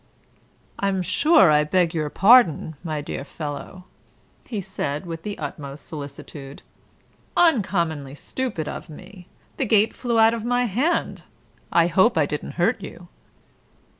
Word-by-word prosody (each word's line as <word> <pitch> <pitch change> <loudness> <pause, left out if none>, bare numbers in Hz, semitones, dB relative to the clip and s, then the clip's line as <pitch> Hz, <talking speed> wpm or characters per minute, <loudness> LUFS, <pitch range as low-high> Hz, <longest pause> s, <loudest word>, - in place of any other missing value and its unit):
"I'm 195 -2 0
sure 280 - +4
I 150 0 +4
beg 170 +2 +1
your 155 -3 -1
pardon, 195 - +5
my 155 -3 -3
dear 145 - -5
fellow," 150 +5 -7 0.6
he 220 - -4
said, 185 -4 -4
with 165 -1 -6
the 205 +3 -5
utmost 145 -1 -7
solicitude. 140 -2 -9 0.7
"Uncommonly 170 - +1
stupid 205 - -4
of - - -7
me. 180 +3 -13 0.3
The 270 - 0
gate 215 +1 +3
flew 235 -2 -2
out 225 0 +6
of 230 -2 -4
my 245 +1 +1
hand. 255 - -1 0.5
I 170 - +4
hope 190 +6 +3
I 155 - +4
didn't 145 - -5
hurt - - +1
you." - - -10
180 Hz, 135 wpm, -23 LUFS, 150-225 Hz, 0.7 s, out